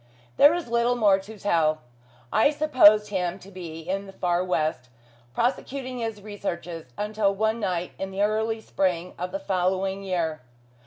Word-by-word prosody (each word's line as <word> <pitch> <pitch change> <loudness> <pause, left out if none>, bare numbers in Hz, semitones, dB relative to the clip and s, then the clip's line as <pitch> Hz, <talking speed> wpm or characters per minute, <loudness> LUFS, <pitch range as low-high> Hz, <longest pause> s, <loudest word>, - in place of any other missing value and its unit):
There 290 +4 +7
is 345 -5 -4
little 235 +1 +2
more 205 -5 +4
to 210 +3 -11
tell. 160 -6 +1 0.5
I 220 +6 +5
supposed 255 -9 +5
him 185 -2 -1
to 195 0 -14
be 170 -4 -8
in 195 +4 -3
the - - -9
far 175 -1 0
west, 155 -8 -1 0.5
prosecuting 255 +1 -2
his 225 -3 -4
researches, 175 -8 -6
until 210 -1 0
one 220 +3 0
night 180 -4 -2
in 195 - -3
the 195 +1 -1
early 220 +1 0
spring 180 -4 -1
of 180 +1 -3
the - - -2
following 190 -4 -1
year. 170 -6 -2
195 Hz, 160 wpm, -25 LUFS, 180-220 Hz, 0.5 s, There